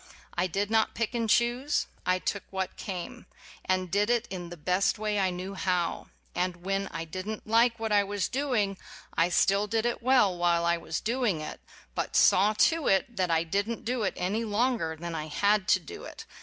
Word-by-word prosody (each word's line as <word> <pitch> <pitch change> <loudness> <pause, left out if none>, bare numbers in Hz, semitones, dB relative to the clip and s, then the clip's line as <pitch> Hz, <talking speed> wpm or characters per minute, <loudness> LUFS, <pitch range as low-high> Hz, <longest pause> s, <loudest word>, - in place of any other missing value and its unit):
I 175 +1 +1
did 200 +4 -2
not 220 -1 +2
pick 230 +1 -1
and 230 -2 -1
choose: 240 +6 +2 0.2
I 185 0 +3
took 200 +2 -2
what 190 -1 -3
came, 210 +5 -6 0.4
and 185 -1 -1
did 205 +2 +2
it 240 -1 +1
in 175 -2 -5
the 175 - -9
best 180 +5 +1
way 210 -1 -1
I 190 -1 +2
knew 185 +2 -5
how; 180 -3 -1 0.3
and 175 0 -2
when 195 0 0
I 165 -2 -5
did 185 +5 -6
n't 220 - -5
like 230 +2 +3
what 225 -1 -2
I 205 -1 +5
was 200 -1 -2
doing 235 -8 -1 0.4
I 165 +1 +3
still 195 +3 +3
did 225 +2 0
it 240 0 -1
well 245 -7 +4
while 170 -1 +2
I 170 0 +3
was 160 -1 -4
doing 230 -7 0
it, 155 - -6 0.3
but - - -3
I - - +5
saw 205 +3 +5
to 325 +8 +2
it 235 +6 +2
that 185 -3 0
I 165 0 +2
did 200 +6 -1
n't 230 - -5
do 245 +1 -1
it 195 - -1
any 200 +6 -1
longer 220 -6 0
than 170 0 -5
I 155 -1 -4
had 200 +5 +2
to - - +5
do 160 - -10
it. - - -9
195 Hz, 215 wpm, -28 LUFS, 180-225 Hz, 0.4 s, I